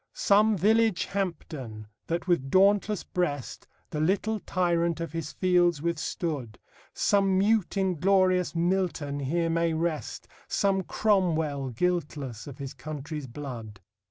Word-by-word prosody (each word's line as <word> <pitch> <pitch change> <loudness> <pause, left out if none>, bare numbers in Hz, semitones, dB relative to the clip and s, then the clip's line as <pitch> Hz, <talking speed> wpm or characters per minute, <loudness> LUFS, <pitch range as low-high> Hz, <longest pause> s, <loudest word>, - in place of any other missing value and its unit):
Some 210 +1 +4
village 215 -1 +3
Hampden, 155 - -4 0.2
that 170 +3 -2
with 155 -7 +1
dauntless 200 +3 +3
breast 145 -7 -3 0.2
The 150 - -3
little 205 +7 +1
tyrant 170 -3 0
of 165 -1 -4
his 165 -2 -4
fields 175 -3 +2
withstood; 155 -6 -3 0.3
Some 195 -2 +2
mute, 210 0 +2
inglorious 185 -1 +2
Milton 170 -5 0
here 165 +5 0
may 165 0 +1
rest, 160 -1 -3 0.2
Some 195 -1 +1
Cromwell 160 -10 +1
guiltless 140 -5 -2
of 140 -2 -9
his 140 -2 -6
country's 150 +1 -6
blood. 120 -6 -8
170 Hz, 120 wpm, -27 LUFS, 145-190 Hz, 0.3 s, Some